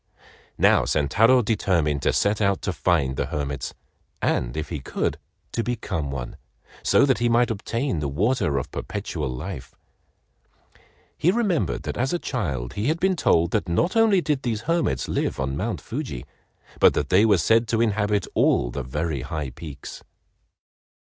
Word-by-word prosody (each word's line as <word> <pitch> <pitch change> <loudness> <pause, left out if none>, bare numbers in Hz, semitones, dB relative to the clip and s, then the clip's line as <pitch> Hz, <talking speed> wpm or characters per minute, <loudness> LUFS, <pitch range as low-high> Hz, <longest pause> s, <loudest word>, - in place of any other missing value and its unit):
Now - - +5
Sentaro 115 - +3
determined 85 -10 +1
to - - +2
set 105 +1 +1
out 100 -1 +1
to 95 - -1
find 80 -8 +1
the - - -1
hermits, 70 -3 -4 0.4
and - - -1
if 75 - -3
he 80 - -4
could, - - -2 0.3
to 115 - -1
become 105 - -3
one, 65 -3 -5 0.4
so - - +4
that 130 -4 +2
he 120 0 +2
might 120 0 +3
obtain 115 - -2
the 75 - -2
water 80 - +1
of 65 - -3
perpetual 75 -3 -4
life. 65 +4 -7 1.4
He 165 - +2
remembered 200 -5 0
that - - -4
as 130 +5 0
a - - +2
child 70 - -3
he 105 +4 -2
had 160 +3 +1
been 190 +1 +2
told 85 - +2
that - - -1
not 165 - +1
only 220 -5 +4
did 150 -5 -1
these 115 -3 -2
hermits 155 - 0
live - - -1
on 65 0 -1
Mount 110 +9 -2
Fuji, 115 - -5 0.5
but - - +6
that 75 - -1
they 95 +3 +5
were 105 -3 +5
said 115 +8 +3
to 110 0 0
inhabit 105 -3 +1
all - - +2
the 70 - -4
very 75 +2 -3
high 75 0 -4
peaks. 70 +1 -9
100 Hz, 170 wpm, -24 LUFS, 70-120 Hz, 1.4 s, but